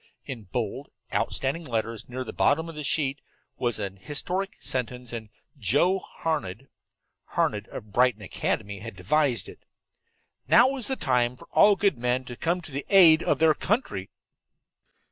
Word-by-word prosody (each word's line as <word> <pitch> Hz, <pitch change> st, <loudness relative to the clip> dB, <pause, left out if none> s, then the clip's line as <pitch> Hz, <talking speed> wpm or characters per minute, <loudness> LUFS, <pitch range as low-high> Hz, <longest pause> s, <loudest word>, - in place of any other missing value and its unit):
In 120 Hz, -5 st, -7 dB
bold, 90 Hz, -, -4 dB, 0.2 s
outstanding 140 Hz, +6 st, -1 dB
letters 115 Hz, -4 st, -3 dB
near 130 Hz, +1 st, -4 dB
the -, -, -8 dB
bottom 160 Hz, +3 st, +2 dB
of 165 Hz, -, -7 dB
the 150 Hz, -1 st, -6 dB
sheet 140 Hz, -1 st, 0 dB, 0.4 s
was 120 Hz, -3 st, 0 dB
an 100 Hz, -1 st, -4 dB
historic 180 Hz, -, -2 dB
sentence, 125 Hz, -1 st, -3 dB
and 110 Hz, -2 st, -6 dB, 0.3 s
Joe 145 Hz, -, +2 dB
Harned 135 Hz, -, -4 dB, 0.6 s
Harned, 105 Hz, 0 st, -1 dB
of 105 Hz, -, -9 dB
Brighton 125 Hz, -3 st, +3 dB
Academy 100 Hz, +1 st, -2 dB
had 115 Hz, 0 st, -8 dB
devised 120 Hz, -, +1 dB
it. -, -, -12 dB, 0.9 s
"NOW 265 Hz, +2 st, +6 dB
IS 250 Hz, -, -2 dB
THE 265 Hz, -, 0 dB
TIME 125 Hz, -, +1 dB
FOR -, -, -15 dB
ALL 205 Hz, 0 st, +6 dB
GOOD 195 Hz, -10 st, +1 dB
MEN 125 Hz, +1 st, 0 dB
TO 125 Hz, -, -7 dB
COME 170 Hz, +7 st, -1 dB
TO 160 Hz, -, -9 dB
THE 140 Hz, +1 st, -4 dB
AID 170 Hz, -5 st, +8 dB
OF -, -, +1 dB
THEIR 160 Hz, -1 st, +5 dB
COUNTRY!" 150 Hz, -, -2 dB
130 Hz, 160 wpm, -26 LUFS, 115-160 Hz, 0.9 s, AID